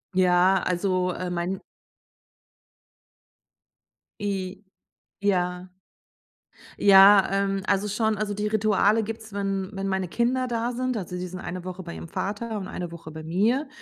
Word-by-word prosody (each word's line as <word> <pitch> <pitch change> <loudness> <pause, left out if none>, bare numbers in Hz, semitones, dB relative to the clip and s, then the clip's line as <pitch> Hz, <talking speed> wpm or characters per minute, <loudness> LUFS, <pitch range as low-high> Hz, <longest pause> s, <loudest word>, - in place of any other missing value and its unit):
Ja, 185 +1 +4
also, 180 0 0
äh, 180 0 -4
mein 175 +2 -3 2.6
I 195 -1 -3 0.6
ja. 180 -2 0 1.1
Ja, 195 0 +8
ähm, 195 0 0
also 200 +1 +1
schon. 215 +1 0
Also, 205 0 -2
die 210 +1 -2
Rituale 215 0 +2
gibt's, 220 0 -7
wenn 195 -1 -2
wenn 195 0 -3
meine 190 -1 -1
Kinder 250 +6 0
da 235 0 -1
sind. 255 0 -2
Also, 180 -3 -5
die 180 0 -4
sind 180 +1 -8
eine 180 -1 -6
Woche 185 0 -6
bei 170 -1 -7
ihrem - - -8
Vater 210 +5 -3
und 190 - -5
eine 175 -2 -5
Woche 165 -2 -10
bei 160 0 -8
mir. 220 - +1
195 Hz, 145 wpm, -25 LUFS, 180-210 Hz, 2.6 s, Ja